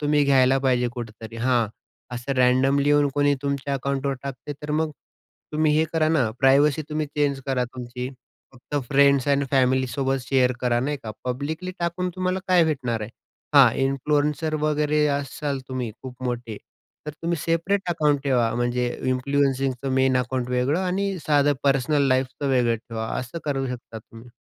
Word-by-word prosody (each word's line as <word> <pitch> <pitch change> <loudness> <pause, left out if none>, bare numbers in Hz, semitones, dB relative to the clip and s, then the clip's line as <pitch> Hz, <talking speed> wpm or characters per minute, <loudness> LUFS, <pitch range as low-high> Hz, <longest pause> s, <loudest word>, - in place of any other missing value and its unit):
तुम्ही 150 -1 +2
घ्यायला 135 -1 +4
पाहिजे 125 -2 +1
कुठेतरी 115 -1 -8
हां 120 -1 +2 0.5
असं 120 +3 -3
रँनडमली 130 +3 +3
येऊन 145 -1 +4
कोणी 145 0 +3
तुमच्या 140 0 -2
अकाउंटवर 140 0 -1
टाकते, 140 +1 -6
तर 150 +1 -8
मग 155 +1 0 0.6
तुम्ही 155 0 +2
हे 160 - +3
करा 160 -1 +2
ना, 160 - +2
तुमची 110 +2 -4
प्रायव्हसी 140 +3 +4
तुम्ही 155 0 -2
चेंज 145 -1 -1
करा 130 -2 0
तुमची, 125 0 -6 0.4
फक्त 130 +3 -7
फ्रेंड्स 140 0 +4
आणि 140 0 +2
फॅमिली 130 -1 +3
सोबत 135 +1 -1
शेअर 125 0 +2
करा 120 -1 +1
नाही 145 +3 -1
का? 110 - -6
पब्लिकली 150 +8 -3
टाकून 175 +1 -1
तुम्हाला 185 0 0
काय 180 -2 +5
भेटणार 130 -7 -1
आहे? 105 +1 -5 0.4
हां, 130 -5 +8
इन्फ्लुएन्सर 150 +3 0
वगैरे 150 0 +2
असाल 140 0 -4
तुम्ही 130 -3 -3
खूप 130 -1 -9
मोठे, 120 -3 -3 0.5
तर 150 - -2
तुम्ही 170 0 0
सेपरेट 170 +5 +1
अकाउंट 150 -4 +1
ठेवा. 120 -5 +2
म्हणजे 120 +1 0 0.2
इन्फ्लुएन्सिंगचं 135 0 0
मेन 130 -1 +3
अकाउंट 125 0 -2
वेगळं 125 +5 +1
आणि 195 +1 -1
साधं 145 -1 +4
पर्सनल 140 +1 +2
लाईफचं 130 +2 0
वेगळं 120 -3 +2
ठेवा 110 0 -6
असं 125 +6 -5
करू 135 -3 -1
शकता 120 -2 -7
तुम्ही. 115 +2 -15
135 Hz, 160 wpm, -24 LUFS, 125-150 Hz, 0.6 s, हां